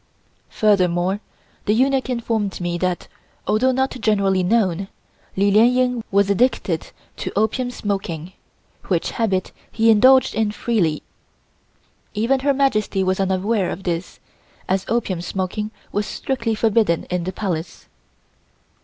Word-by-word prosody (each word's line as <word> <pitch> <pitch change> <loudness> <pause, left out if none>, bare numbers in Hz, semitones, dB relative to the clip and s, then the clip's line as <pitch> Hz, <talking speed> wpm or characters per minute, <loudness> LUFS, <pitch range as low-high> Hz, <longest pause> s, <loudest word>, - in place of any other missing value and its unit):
Furthermore, 185 -2 +2 0.5
the 210 - +3
eunuch 265 +2 +2
informed 225 -5 -1
me 175 -1 -2
that, 180 -1 -1 0.4
although 255 +5 +2
not 265 +1 0
generally 200 -3 +2
known, 195 -2 +1 0.5
Li 200 +1 +3
Lien 220 +4 +6
Ying 250 -2 +1
was 200 0 +3
addicted 200 -5 +1 0.3
to - - -4
opium 220 +5 +1
smoking, 190 -7 -4 0.5
which - - 0
habit 195 -6 -1 0.2
he 225 0 +4
indulged 255 +4 +5
in 220 - +1
very 210 - -3
freely. 180 -10 +1 1.1
Even 235 +6 +2
Her 280 +2 +2
Majesty 215 -8 +1
was 185 +1 0
unaware 190 +1 +1
of 190 - -6
this, 170 -1 -3 0.5
as 190 0 0
opium 215 -7 -1
smoking 190 +4 -3 0.2
was 205 0 -1
strictly 230 -4 -2
forbidden 215 -6 +2
in 180 -1 -1
the 185 - -2
Palace. 175 -4 -4
205 Hz, 130 wpm, -21 LUFS, 185-230 Hz, 1.1 s, Lien